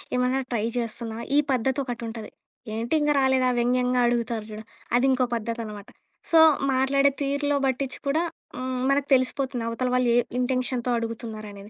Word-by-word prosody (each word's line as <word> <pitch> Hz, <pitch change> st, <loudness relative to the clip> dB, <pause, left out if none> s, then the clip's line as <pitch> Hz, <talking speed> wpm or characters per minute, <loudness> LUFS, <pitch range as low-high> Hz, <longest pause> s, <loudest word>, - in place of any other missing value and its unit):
ఏమన్నా 250 Hz, +2 st, +1 dB
ట్రై 220 Hz, -2 st, 0 dB
చేస్తున్నావా, 230 Hz, 0 st, -4 dB
ఈ -, -, +6 dB
పద్ధతొకటుంటది. 240 Hz, -3 st, -3 dB, 0.4 s
ఏంటి 230 Hz, +5 st, -3 dB
ఇంకా 295 Hz, 0 st, +2 dB
రాలేదా? 265 Hz, -1 st, +3 dB
వ్యంగ్యంగా 250 Hz, +1 st, +2 dB
అడుగుతారు 235 Hz, -2 st, -1 dB
చూడు? 215 Hz, 0 st, -8 dB, 0.3 s
అదింకో 260 Hz, +1 st, +3 dB
పద్ధతనమాట. 225 Hz, -3 st, -4 dB, 0.4 s
సో, 330 Hz, -, +6 dB, 0.3 s
మాట్లాడే 270 Hz, +2 st, +3 dB
తీరులో 285 Hz, +1 st, 0 dB
బట్టిచ్చి 265 Hz, 0 st, -1 dB
కూడా 295 Hz, +4 st, +2 dB, 0.4 s
హ్మ్, 255 Hz, 0 st, -3 dB
మనకు 280 Hz, 0 st, +1 dB
తెలిసిపోతుంది 255 Hz, -1 st, 0 dB
అవతల 230 Hz, +2 st, -1 dB
వాళ్ళు 250 Hz, -1 st, +2 dB
ఏ -, -, +5 dB, 0.2 s
ఇంటెన్షన్‌తో 250 Hz, -1 st, -1 dB
అడుగుతున్నారనేది. 215 Hz, -3 st, -6 dB
250 Hz, 135 wpm, -25 LUFS, 230-265 Hz, 0.4 s, ఈ